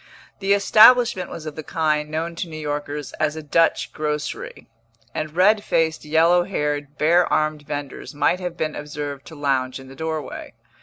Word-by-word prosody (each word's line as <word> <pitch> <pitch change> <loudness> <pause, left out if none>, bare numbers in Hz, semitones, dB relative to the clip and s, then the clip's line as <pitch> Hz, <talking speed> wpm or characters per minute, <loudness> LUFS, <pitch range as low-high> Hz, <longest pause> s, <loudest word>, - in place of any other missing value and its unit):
The 195 0 +2
establishment 215 -1 +5
was 160 - -8
of 155 -1 -6
the 155 - -5
kind 150 -1 -1
known 165 +2 -3
to 175 - -4
New 155 - -7
Yorkers 145 -1 -4
as 155 0 0
a 160 - -7
Dutch 165 +3 +1
grocery; 150 -1 -4 0.5
and 155 0 -4
red 205 +4 +4
faced, 160 -1 0
yellow 165 +3 +4
haired, 150 -5 -3
bare 170 +3 +3
armed 155 0 +1
vendors 145 0 -6
might 150 +5 +2
have 180 -2 -5
been 155 -1 -2
observed 145 -1 -6
to 160 - -11
lounge 135 -3 -1
in 135 0 -12
the 135 - -12
doorway. 160 +1 -5
155 Hz, 170 wpm, -22 LUFS, 145-170 Hz, 0.5 s, establishment